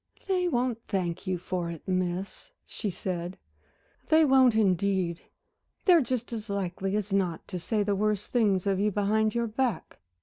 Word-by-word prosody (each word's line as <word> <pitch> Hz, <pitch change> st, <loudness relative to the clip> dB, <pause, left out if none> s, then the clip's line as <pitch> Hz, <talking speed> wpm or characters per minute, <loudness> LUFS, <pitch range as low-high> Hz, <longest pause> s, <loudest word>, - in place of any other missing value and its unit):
"They 365 Hz, -2 st, +1 dB
won't 245 Hz, -6 st, 0 dB
thank 180 Hz, -2 st, -2 dB
you 185 Hz, -1 st, 0 dB
for 175 Hz, 0 st, -3 dB
it, 165 Hz, -2 st, -8 dB
Miss," 185 Hz, +1 st, -2 dB, 0.2 s
she 210 Hz, -, -4 dB
said 180 Hz, -1 st, -4 dB, 0.7 s
"they 315 Hz, 0 st, +6 dB
won't 260 Hz, -4 st, +5 dB
indeed. 190 Hz, -4 st, +1 dB, 0.6 s
They're 350 Hz, -4 st, +7 dB
just 245 Hz, -2 st, -3 dB
as 220 Hz, -1 st, -5 dB
likely 195 Hz, 0 st, -2 dB
as 210 Hz, -1 st, -2 dB
not 180 Hz, -4 st, 0 dB
to 180 Hz, -, -4 dB
say 210 Hz, +5 st, 0 dB
the 200 Hz, 0 st, 0 dB
worst 210 Hz, 0 st, -1 dB
things 205 Hz, -6 st, +2 dB
of 195 Hz, -1 st, +1 dB
you 210 Hz, +1 st, +2 dB
behind 215 Hz, +2 st, +1 dB
your 235 Hz, 0 st, +1 dB
back." 230 Hz, -4 st, -2 dB
200 Hz, 165 wpm, -28 LUFS, 185-230 Hz, 0.7 s, They're